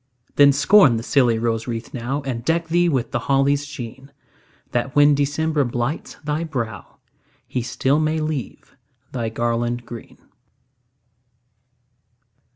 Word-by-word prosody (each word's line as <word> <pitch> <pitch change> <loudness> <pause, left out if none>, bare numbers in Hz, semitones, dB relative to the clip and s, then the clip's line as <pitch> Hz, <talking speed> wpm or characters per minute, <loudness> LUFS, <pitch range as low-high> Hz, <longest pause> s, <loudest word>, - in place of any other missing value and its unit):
Then, 145 0 +7
scorn 140 - +5
the 115 - -4
silly 120 -4 +3
rose 115 0 -1
wreath 115 -1 -5
now, 130 +4 -3
And 125 -4 -4
deck 165 +3 0
thee 175 +1 +3
with 130 -6 -1
the - - 0
holly's 140 +1 +2
sheen, 135 0 -9 0.6
That, 125 +2 -2
when 145 0 +6
December 145 +2 +1
blights 120 +4 -3
thy 150 +2 -1
brow, 115 - -5 0.5
He 125 - -2
still 135 +4 0
may 155 0 0
leave 155 -4 -5 0.4
thy 115 -3 -2
garland 120 +1 -1
green. 115 -1 -10
135 Hz, 130 wpm, -21 LUFS, 120-150 Hz, 0.6 s, Then